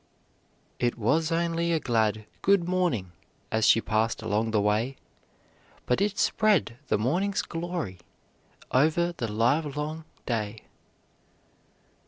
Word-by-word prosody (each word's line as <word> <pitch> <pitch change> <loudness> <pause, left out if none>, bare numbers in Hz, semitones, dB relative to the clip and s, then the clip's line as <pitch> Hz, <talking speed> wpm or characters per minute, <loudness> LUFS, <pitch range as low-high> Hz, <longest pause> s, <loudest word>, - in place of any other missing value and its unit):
'" - - -39 0.3
"It 120 -1 0
was 155 +9 +1
only 170 0 0
a 165 - +2
glad 110 -5 0 0.2
'good 195 -3 +3
morning,' 175 - 0 0.4
As 110 0 +2
she 115 - +6
passed 110 +1 0
along 110 +2 0
the 110 -1 +2
way, 105 +6 +1 0.9
But 125 - +1
it 205 +1 0
spread 210 - +2
the - - +2
morning's 180 - 0
glory 165 - -4 0.7
Over 160 +6 +3
the 115 -7 -3
livelong 150 +7 0 0.2
day." 110 -2 -3
135 Hz, 120 wpm, -27 LUFS, 110-170 Hz, 0.9 s, she